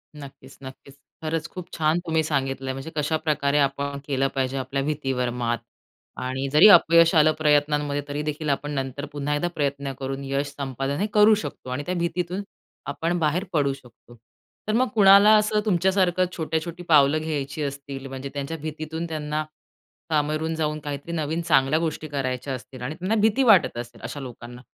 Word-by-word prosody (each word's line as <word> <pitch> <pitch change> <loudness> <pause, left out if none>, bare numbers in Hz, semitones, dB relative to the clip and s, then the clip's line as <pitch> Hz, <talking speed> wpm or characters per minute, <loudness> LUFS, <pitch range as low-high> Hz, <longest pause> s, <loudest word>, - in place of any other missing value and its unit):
नक्कीच, 140 -2 -12
नक्कीच. 135 +1 -11 0.3
खरंच 160 0 -2
खूप 180 -2 -8
छान 160 +1 +2
तुम्ही 160 -1 +1
सांगितलं 135 -3 -2
आहे. 130 - -1
म्हणजे 135 +4 -7
कशाप्रकारे 150 -1 0
आपण 140 0 0
केलं 135 -1 +1
पाहिजे 135 0 -1
आपल्या 135 +1 -2
भीतीवर 135 -4 -1
मात. 120 -1 -1 0.6
आणि 130 +2 -3
जरी 160 +8 +8
अपयश 170 -2 +6
आलं 155 0 +6
प्रयत्नांमध्ये 145 -1 +2
तरीदेखील 150 +1 -3
आपण 145 +1 -1
नंतर 135 0 -3
पुन्हा 145 0 -2
एकदा 175 +4 0
प्रयत्न 140 -1 -2
करून 135 +1 -4
यश 140 +1 -1
संपादन 135 0 -3
हे 205 - 0
करू 210 +1 +6
शकतो. 205 -10 -7
आणि 135 +3 -3
त्या 180 - -2
भीतीतून 175 +2 -2 0.4
आपण 165 +4 -1
बाहेर 160 +4 +1
पडू 140 -3 +2
शकतो. 120 -2 -16 0.5
तर 215 - 0
मग 255 +3 +3
कुणाला 200 +1 +7
असं 210 0 +2
तुमच्यासारखं 185 -1 +2
छोट्या-छोटी 165 +2 -3
पावलं 145 -1 +5
घ्यायची 150 -2 -3
असतील? 140 -1 -6
म्हणजे 135 +1 -6
त्यांच्या 145 +3 -4
भीतीतून 155 +2 -5
त्यांना, 155 -1 -3 0.7
कांगावून 155 +1 0
जाऊन 155 -1 -1
काहीतरी 145 +2 -6
नवीन 160 +1 -2
चांगल्या 150 -2 +3
गोष्टी 160 -1 -3
करायच्या 135 -1 -3
असतील 130 0 -9
आणि 140 +5 -4
त्यांना 190 +5 -1
भीती 220 +5 +3
वाटत 200 - +5
असेल 120 -1 -8
अशा 145 - -6
लोकांना. 125 -1 -9
150 Hz, 165 wpm, -24 LUFS, 135-165 Hz, 0.7 s, जरी